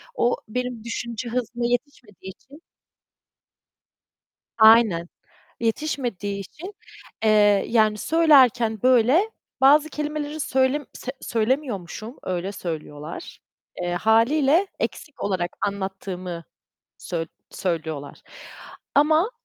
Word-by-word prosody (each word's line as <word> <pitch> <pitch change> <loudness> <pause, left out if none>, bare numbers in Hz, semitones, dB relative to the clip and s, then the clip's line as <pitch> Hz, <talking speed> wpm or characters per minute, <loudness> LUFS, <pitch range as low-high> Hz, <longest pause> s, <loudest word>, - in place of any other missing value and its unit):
O, 245 - +2
benim 250 0 -4
düşünce 235 0 -5
hızına 240 0 -2
yetişmediği 240 -6 -4
için 285 - -18 2.0
Aynen, 220 -6 +6 0.5
yetişmediği 225 -5 -2
için, 345 - -9 0.5
eee, 220 - +5 0.4
yani 215 -2 +3
söylerken 255 - +4
böyle 255 - +4 0.3
bazı 290 +3 +6
kelimeleri 300 0 -4
söylem 265 +1 +1
se 260 - -6
söylemiyormuşum, 225 - -2
öyle 185 +2 -3
söylüyorlar. 155 -3 -7 0.4
Eee, 175 0 -1
hâliyle 270 - +3
eksik 300 -3 -5
olarak 185 -3 -1
anlattığımı 190 -3 -4 0.5
söy 165 -2 -4 0.2
söylüyorlar 160 -5 -4 0.7
ama 310 +8 +4
230 Hz, 85 wpm, -23 LUFS, 190-280 Hz, 2.0 s, Aynen